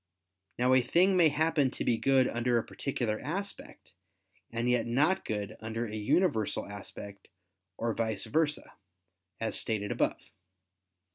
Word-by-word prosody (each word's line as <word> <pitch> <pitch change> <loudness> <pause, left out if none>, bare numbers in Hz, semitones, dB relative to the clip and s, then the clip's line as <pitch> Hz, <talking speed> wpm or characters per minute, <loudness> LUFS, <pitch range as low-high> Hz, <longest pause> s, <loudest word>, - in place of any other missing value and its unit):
Now 125 +1 +3
a 130 - +6
thing 180 +10 +3
may 170 -3 +6
happen 150 -2 +2
to - - -4
be 115 -2 +2
good 135 -1 +4
under 120 +1 +1
a 115 - +1
particular 120 -6 -3
aspect, 195 +6 -6 0.6
and 115 +1 -2
yet 125 -1 +2
not 155 +11 +2
good 105 -2 -4
under 110 +2 -3
a 110 -1 -6
universal 110 - +1
aspect, 100 0 -9 0.5
or 115 -1 -1
vice 110 -2 -1
versa, 150 +6 -1 0.7
as 115 - -2
stated 105 -2 -2
above. - - +1
120 Hz, 140 wpm, -30 LUFS, 110-150 Hz, 0.7 s, a